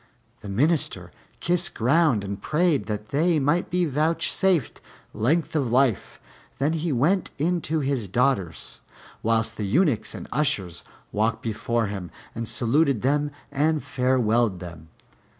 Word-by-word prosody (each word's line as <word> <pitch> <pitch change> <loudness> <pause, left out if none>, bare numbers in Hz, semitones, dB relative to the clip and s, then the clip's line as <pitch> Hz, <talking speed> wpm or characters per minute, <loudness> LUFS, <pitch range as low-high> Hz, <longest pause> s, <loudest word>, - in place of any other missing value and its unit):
The 100 - -9
Minister 105 - 0 0.3
kissed 175 0 +1
ground 130 -2 +2
and 100 0 -5
prayed 155 -2 +1
that 105 -1 -4
they 160 +4 +2
might 150 +5 +1
be 180 0 +1
vouchsafed 160 - 0 0.3
length 155 +9 0
of 140 -6 +1
life: 125 -3 +1 0.4
then 145 +4 +1
he 165 0 -1
went 155 +9 +1
in 170 +4 0
to 155 0 -1
his 135 -6 -1
daughters, 100 -5 -1 0.4
whilst 115 0 0
the 105 - -2
Eunuchs 135 - +1
and - - -8
Ushers 100 - -1 0.3
walked 110 +2 0
before 115 +1 -1
him, 100 -4 -5 0.2
and 115 0 -4
saluted 130 0 +1
them 145 +2 +1 0.2
and 155 +2 +1
farewelled 120 - +1
them. 85 -2 -10
130 Hz, 135 wpm, -24 LUFS, 110-155 Hz, 0.4 s, ground